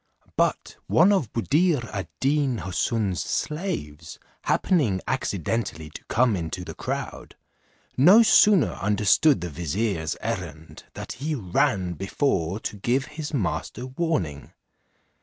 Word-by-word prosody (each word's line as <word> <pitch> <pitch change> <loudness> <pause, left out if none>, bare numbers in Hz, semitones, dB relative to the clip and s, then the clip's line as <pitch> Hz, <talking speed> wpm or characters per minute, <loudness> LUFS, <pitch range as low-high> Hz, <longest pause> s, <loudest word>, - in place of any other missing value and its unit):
But - - 0
one 180 +5 +5
of 185 - +1
Buddir 145 +2 +1
ad 100 -2 -4
Deen 140 -2 +1
Houssun's 95 +2 -1
slaves 150 - -4 0.3
happening 130 - +2
accidentally 100 - -2
to - - -10
come 120 -2 +2
into 90 +1 -4
the - - -7
crowd, - - -5 0.6
no 185 - +7
sooner 210 -6 +5
understood 105 - +3
the 90 - -4
vizier's 85 0 -2
errand, 75 +1 -6
than - - -6
he 150 +5 -3
ran 90 -4 0
before 95 - -1
to 105 - -5
give 125 +6 0
his 150 -1 -5
master 125 - -3
warning. 130 - -3
115 Hz, 120 wpm, -25 LUFS, 90-145 Hz, 0.6 s, no